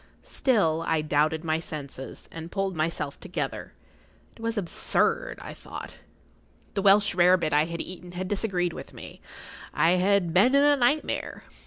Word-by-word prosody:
Still 165 Hz, -, +1 dB
I 160 Hz, -1 st, +2 dB
doubted 155 Hz, +2 st, +1 dB
my 160 Hz, 0 st, +1 dB
senses, 140 Hz, -4 st, -8 dB
and 165 Hz, +1 st, -8 dB
pulled 195 Hz, -2 st, -2 dB
myself 155 Hz, -3 st, -2 dB
together. 185 Hz, -, -5 dB, 0.6 s
It -, -, -15 dB
was 230 Hz, 0 st, -2 dB
absurd, 205 Hz, -, 0 dB
I -, -, -7 dB
thought. -, -, -9 dB, 0.8 s
The 200 Hz, -, -1 dB
Welsh 200 Hz, +1 st, +5 dB
rare 180 Hz, +1 st, +5 dB
bit 155 Hz, -4 st, -2 dB
I 150 Hz, +1 st, +4 dB
had 170 Hz, 0 st, -4 dB
eaten 180 Hz, -1 st, -7 dB
had 185 Hz, +1 st, -4 dB
disagreed 185 Hz, -4 st, 0 dB
with -, -, -10 dB
me. -, -, -11 dB, 0.5 s
I 165 Hz, -, +4 dB
had 190 Hz, -3 st, +2 dB
been 240 Hz, +10 st, +5 dB
in 280 Hz, -, +5 dB
a 290 Hz, 0 st, +5 dB
nightmare. 285 Hz, +4 st, 0 dB
180 Hz, 160 wpm, -26 LUFS, 160-205 Hz, 0.8 s, Welsh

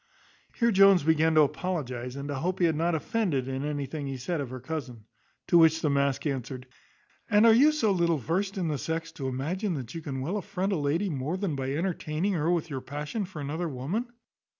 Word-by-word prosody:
Here 235 Hz, -1 st, +2 dB
Jones 195 Hz, -3 st, +6 dB
began 160 Hz, +1 st, +3 dB
to 155 Hz, -, +7 dB
apologize, 135 Hz, -5 st, -2 dB
and 140 Hz, 0 st, -5 dB
to -, -, -2 dB
hope 175 Hz, +7 st, -2 dB
he 175 Hz, -, +3 dB
had 160 Hz, -2 st, +2 dB
not 165 Hz, +2 st, +1 dB
offended 160 Hz, -, -1 dB
in 135 Hz, +1 st, -3 dB
anything 145 Hz, 0 st, -3 dB
he 135 Hz, -, -3 dB
had 130 Hz, -, -7 dB
said 165 Hz, +3 st, -2 dB
of 135 Hz, -, -5 dB
her 130 Hz, 0 st, -6 dB
cousin. 130 Hz, -4 st, -6 dB, 0.4 s
To 170 Hz, -, +5 dB
which 160 Hz, 0 st, +5 dB
the 150 Hz, -, +2 dB
mask 140 Hz, 0 st, +1 dB
answered, 130 Hz, -2 st, -3 dB, 0.6 s
"And 210 Hz, 0 st, +5 dB
are 225 Hz, -, +8 dB
you 280 Hz, +7 st, +6 dB
so 265 Hz, -9 st, +1 dB
little 170 Hz, -3 st, +2 dB
versed 190 Hz, -, -2 dB
in 180 Hz, -3 st, -1 dB
the 150 Hz, -3 st, -1 dB
sex, 165 Hz, 0 st, -3 dB
to 135 Hz, -4 st, -5 dB
imagine 150 Hz, -, -2 dB
you 165 Hz, -, -6 dB
can 135 Hz, -3 st, -4 dB
well 170 Hz, +10 st, -2 dB
affront 195 Hz, -1 st, -2 dB
a -, -, +1 dB
lady 155 Hz, +7 st, 0 dB
more 145 Hz, +5 st, -2 dB
than 190 Hz, -6 st, -2 dB
by 135 Hz, 0 st, -2 dB
entertaining 170 Hz, +2 st, -1 dB
her 165 Hz, -2 st, 0 dB
with 170 Hz, -2 st, +1 dB
your 135 Hz, -4 st, -5 dB
passion 145 Hz, -, -4 dB
for 175 Hz, -5 st, -8 dB
another 160 Hz, +4 st, -3 dB
woman? 155 Hz, -, -3 dB
160 Hz, 220 wpm, -28 LUFS, 140-185 Hz, 0.6 s, are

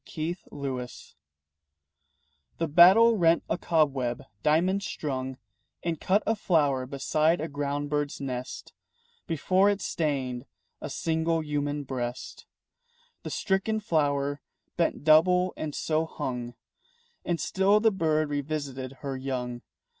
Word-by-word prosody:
RANGE 160 Hz, +3 st, -1 dB
FINDING 135 Hz, -3 st, -4 dB, 1.7 s
The 165 Hz, -, -1 dB
battle 190 Hz, +9 st, +7 dB
rent 170 Hz, -2 st, +4 dB
a -, -, 0 dB
cobweb 135 Hz, -7 st, +1 dB, 0.2 s
diamond 180 Hz, +6 st, +2 dB
strung 130 Hz, -8 st, -4 dB, 0.5 s
And 165 Hz, -3 st, -2 dB
cut 200 Hz, +3 st, +2 dB
a 225 Hz, -, +2 dB
flower 145 Hz, -10 st, +1 dB
beside 155 Hz, +5 st, +1 dB
a 160 Hz, -, -2 dB
ground 145 Hz, 0 st, -3 dB
bird's 145 Hz, -1 st, -1 dB
nest 130 Hz, -2 st, -6 dB, 0.5 s
Before 185 Hz, +5 st, +3 dB
it 200 Hz, -1 st, 0 dB
stained 135 Hz, -8 st, -2 dB, 0.3 s
a -, -, -5 dB
single 165 Hz, 0 st, 0 dB
human 145 Hz, -1 st, -2 dB
breast. 125 Hz, -2 st, -5 dB, 0.7 s
The -, -, -6 dB
stricken 200 Hz, +3 st, 0 dB
flower 145 Hz, -6 st, 0 dB, 0.3 s
bent 170 Hz, -4 st, 0 dB
double 180 Hz, +4 st, +5 dB
and 150 Hz, -2 st, -5 dB
so 160 Hz, 0 st, 0 dB
hung. 125 Hz, -6 st, -5 dB, 0.7 s
And 170 Hz, -2 st, -1 dB
still 195 Hz, +2 st, +3 dB
the 225 Hz, +1 st, +4 dB
bird 155 Hz, -5 st, +1 dB
revisited 140 Hz, -3 st, -3 dB
her 140 Hz, -2 st, -3 dB
young. 125 Hz, -2 st, -4 dB
150 Hz, 120 wpm, -27 LUFS, 135-170 Hz, 1.7 s, battle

